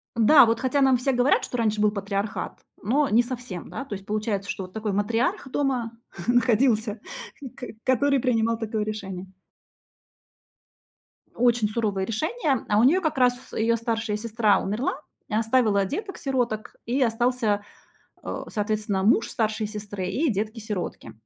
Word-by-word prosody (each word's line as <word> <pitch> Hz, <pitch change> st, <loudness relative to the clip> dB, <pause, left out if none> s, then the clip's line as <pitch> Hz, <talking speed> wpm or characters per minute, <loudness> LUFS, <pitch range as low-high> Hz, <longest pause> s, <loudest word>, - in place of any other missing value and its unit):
Да, 235 Hz, +5 st, +7 dB
вот, 230 Hz, 0 st, +1 dB
хотя 265 Hz, +2 st, +1 dB
нам 265 Hz, -2 st, +5 dB
все 255 Hz, +3 st, 0 dB
говорят, 250 Hz, +2 st, +3 dB
что 245 Hz, -, -4 dB
раньше 215 Hz, -2 st, +1 dB
был 210 Hz, 0 st, +4 dB
патриархат, 200 Hz, 0 st, -3 dB, 0.2 s
но 275 Hz, +7 st, +2 dB
не 225 Hz, +3 st, +5 dB
совсем, 240 Hz, -8 st, -6 dB
да? 275 Hz, -, -5 dB
То 240 Hz, -, -7 dB
есть 195 Hz, 0 st, -10 dB
получается, 210 Hz, -1 st, -2 dB
что 195 Hz, -, -3 dB
вот 185 Hz, 0 st, -11 dB
такой 220 Hz, -1 st, -2 dB
матриарх 225 Hz, +7 st, 0 dB
дома 255 Hz, -4 st, -1 dB, 0.4 s
находился, 235 Hz, -2 st, +2 dB, 0.4 s
и 270 Hz, -, -6 dB
к 260 Hz, +2 st, -14 dB, 0.2 s
который 275 Hz, +2 st, +3 dB
принимал 230 Hz, -2 st, +1 dB
такое 220 Hz, -1 st, -2 dB
решение. 195 Hz, -3 st, -5 dB, 2.1 s
Очень 240 Hz, -2 st, +3 dB
суровое 210 Hz, -3 st, -1 dB
решения. 285 Hz, -, -1 dB
А 210 Hz, -, +4 dB
у -, -, +5 dB
неё 330 Hz, +9 st, +5 dB
как 315 Hz, -5 st, -1 dB
раз 245 Hz, -1 st, +1 dB
её 230 Hz, +1 st, +2 dB
старшая 225 Hz, -2 st, -2 dB
сестра 215 Hz, -3 st, +2 dB
умерла 215 Hz, +7 st, -2 dB, 0.3 s
и 210 Hz, -, -1 dB
оставила 220 Hz, -3 st, +3 dB
деток-сироток, 260 Hz, -, -3 dB
и 255 Hz, +4 st, 0 dB
остался, 230 Hz, -3 st, +1 dB, 0.6 s
а, -, -, -5 dB
соответственно, 210 Hz, -2 st, -1 dB
муж 225 Hz, +1 st, +4 dB
старшей 220 Hz, -2 st, -1 dB
сестры 205 Hz, -3 st, -5 dB
и 275 Hz, -, +1 dB
детки-сиротки. 210 Hz, -, -4 dB
225 Hz, 150 wpm, -25 LUFS, 210-250 Hz, 2.1 s, Да